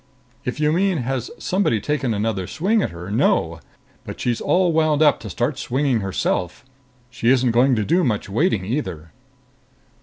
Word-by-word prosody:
"If 125 +2 -3
you 150 0 +2
mean 185 +2 +1
has 130 -1 -3
somebody 180 - 0
taken 145 +1 -1
another 105 -3 -2
swing 205 +7 +1
at - - -1
her, 85 +3 -8
no. 110 - +1 0.4
But - - -8
she's 120 -2 -1
all 180 -2 +2
wound 155 -1 +3
up 150 - +4
to - - -8
start 130 +3 -2
swinging 130 -1 0
herself. 95 0 -2 0.5
She 115 -1 0
isn't 130 -1 +3
going 125 +3 +3
to 105 -2 -1
do 175 +3 +2
much 110 -8 -1
waiting 105 - 0
either." 95 - -4
125 Hz, 170 wpm, -21 LUFS, 110-155 Hz, 0.5 s, up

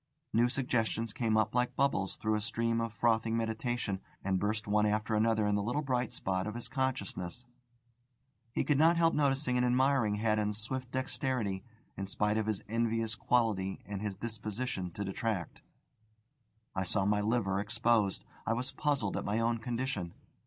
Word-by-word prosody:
New 120 +2 +4
suggestions 115 -4 0
came 110 -3 +1
up 110 -2 +2
like 125 0 +1
bubbles 135 -9 +1
through 110 0 0
a 105 - +1
stream 115 +1 0
of 115 -1 -2
frothing 115 0 +2
meditation, 110 -2 -1 0.2
and 95 -1 +1
burst 105 +2 0
one 105 +1 +3
after 105 +2 0
another 110 0 +3
in 105 - +2
the 100 - +2
little 120 +9 -1
bright 125 -3 0
spot 95 0 -1
of 105 - -4
his 120 - -4
consciousness. 125 -5 -2 1.1
He - - 0
could 145 -2 +2
not 165 +2 +6
help 165 0 +4
noticing 135 -3 +2
and 125 - +3
admiring 125 -3 +3
Haddon's 105 -1 +1
swift 125 +3 -3
dexterity, 130 -6 -2 0.3
in 100 - -4
spite 105 +2 +1
of 110 - -1
his 110 -3 -1
envious 115 0 0
quality 110 -4 +1
and 100 -1 -5
his 105 -3 -3
disposition 110 -2 -3
to 100 - -3
detract. 100 -1 -3 1.1
I 95 - 0
saw 95 +1 +1
my 105 0 +2
liver 105 -3 +1
exposed. 105 -1 +1 0.2
I 110 - +3
was 125 +3 -2
puzzled 135 -7 0
at - - -2
my 105 +2 0
own 115 0 +1
condition. 115 -6 -3
110 Hz, 170 wpm, -32 LUFS, 105-125 Hz, 1.1 s, not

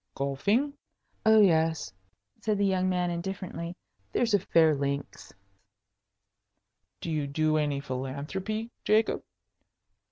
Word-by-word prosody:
"Golfing?" 200 - +1 0.5
"Oh 220 0 +7
yes," 160 - +2 0.5
said 215 -2 0
the 200 - +2
young 185 -1 +2
man, 180 -1 0
indifferently. 170 -1 -5 0.4
"There's 230 -3 +1
a 205 - +5
fair 165 -3 +4
links." 140 0 -3 1.7
"Do 165 - -3
you 150 -2 -1
do 155 +2 +1
any 145 -2 0
philanthropy, 145 - -4
Jacob?" 215 +1 +2
170 Hz, 105 wpm, -28 LUFS, 145-200 Hz, 1.7 s, Oh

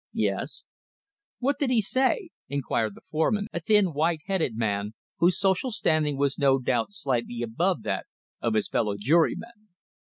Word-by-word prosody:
"Yes." - - -1 0.7
"What 275 +3 0
did 280 - +1
he 245 -3 +3
say?" 265 - +1 0.2
inquired 115 -6 -1
the - - -15
foreman, 200 +7 +1
a 170 - -1
thin, 195 0 +3
white 160 +2 +1
headed 185 - -1
man 105 -1 -1 0.2
whose 175 +2 +4
social 195 +5 +2
standing 155 - +1
was 140 +1 0
no 135 -2 +4
doubt 125 -3 0
slightly 120 -9 -2
above 115 -1 0
that - - -2 0.3
of 115 -2 0
his 110 - +1
fellow 105 -3 0
jurymen. 170 - +1
155 Hz, 155 wpm, -26 LUFS, -, 0.7 s, whose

